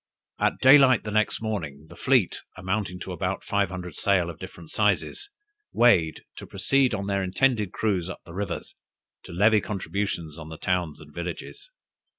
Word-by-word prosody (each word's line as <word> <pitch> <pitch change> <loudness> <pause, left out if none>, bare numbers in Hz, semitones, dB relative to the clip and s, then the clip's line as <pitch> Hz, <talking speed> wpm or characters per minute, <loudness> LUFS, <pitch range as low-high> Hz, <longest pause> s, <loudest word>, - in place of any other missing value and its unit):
"At - - +1
day 135 +3 +8
light 130 -3 +5
the 105 - -5
next 110 +1 +1
morning, 80 -10 -4
the - - -13
fleet, - - +2 0.2
amounting 95 0 -2
to - - -6
above - - -3
five 100 -2 0
hundred 90 -3 -7
sail 90 -4 +1
of 80 - -15
different 85 -3 -10
sizes, 110 - 0 0.4
weighed, 90 -10 +4
to - - -8
proceed 135 -4 +2
on 100 -1 -4
their 100 -1 0
intended 105 +2 +1
cruise 95 -5 -1
up 90 - -7
the 85 - -11
rivers, 100 +2 -4 0.5
to - - -10
levy 105 +4 +4
contributions 95 -6 -3
on 80 -1 -9
the 80 - -8
towns 90 -5 -1
and 75 0 -14
villages. 85 - -7
95 Hz, 170 wpm, -26 LUFS, 85-110 Hz, 0.5 s, day